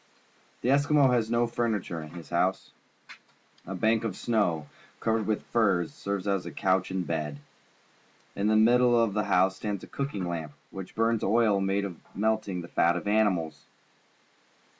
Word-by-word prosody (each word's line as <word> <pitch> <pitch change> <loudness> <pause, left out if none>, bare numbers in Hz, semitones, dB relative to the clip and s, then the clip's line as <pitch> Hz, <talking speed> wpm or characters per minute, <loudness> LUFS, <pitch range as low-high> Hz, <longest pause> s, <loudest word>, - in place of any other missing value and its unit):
The 125 - 0
Eskimo 140 -1 +4
has 115 -2 +1
no 120 +1 +2
furniture 110 -8 -2
in 75 - -9
his 85 0 -11
hou.se. - - 0 1.0
A 95 - -4
bank 110 +4 +2
of 110 -5 -3
snow, 95 -10 0 0.3
covered 110 -1 0
with 110 -1 -1
furs, 95 -8 +2
serves 100 -1 -4
as 100 -2 0
couch 95 -1 +1
and 95 -1 -2
bed. 75 -3 -3 1.0
In 100 +1 0
the 110 - +3
middle 120 +2 +5
of 115 -3 +2
the 105 -1 0
house 95 +1 +2
stands 100 -2 -4
a - - -9
cooking 120 -10 -3
lamp, 80 -4 -4 0.2
which 95 -1 -8
burns 115 0 +1
oil 105 -1 +3
made 95 +1 0
by 95 -4 -6
melting 110 -3 0
the 85 - -9
fat 85 0 +2
of 90 - -4
animals. 90 -9 0
100 Hz, 160 wpm, -28 LUFS, 90-115 Hz, 1.0 s, middle